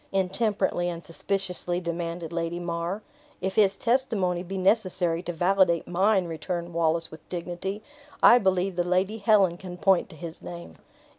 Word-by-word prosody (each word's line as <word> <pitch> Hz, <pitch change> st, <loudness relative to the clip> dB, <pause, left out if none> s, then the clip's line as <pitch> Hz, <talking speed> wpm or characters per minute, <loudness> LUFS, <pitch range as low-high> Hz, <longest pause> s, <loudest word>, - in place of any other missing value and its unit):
intemperately 190 Hz, -2 st, 0 dB
and 170 Hz, -2 st, -6 dB
suspiciously 180 Hz, +1 st, -2 dB
demanded 170 Hz, -1 st, -4 dB
Lady 170 Hz, 0 st, -2 dB
mar. 175 Hz, +4 st, -3 dB, 0.4 s
"If 190 Hz, +1 st, -2 dB
his 195 Hz, -2 st, +3 dB
testimony 220 Hz, -8 st, +1 dB
be 190 Hz, +2 st, -5 dB
necessary 185 Hz, -4 st, +1 dB
to 175 Hz, -, -4 dB
validate 175 Hz, 0 st, +2 dB
mine," 190 Hz, +2 st, +2 dB
returned 170 Hz, +1 st, -4 dB
Wallace, 165 Hz, 0 st, +1 dB
with 160 Hz, -, -13 dB
dignity, 180 Hz, +4 st, -4 dB, 0.4 s
"I 245 Hz, -, +9 dB
believe 190 Hz, -2 st, +1 dB
the 175 Hz, -, +2 dB
Lady 185 Hz, +5 st, 0 dB
Helen 200 Hz, -5 st, +4 dB
can 180 Hz, -1 st, -8 dB
point 190 Hz, 0 st, +3 dB
to 170 Hz, -, -12 dB
his 165 Hz, +1 st, -8 dB
name." 85 Hz, -2 st, -9 dB
180 Hz, 150 wpm, -26 LUFS, 170-195 Hz, 0.4 s, I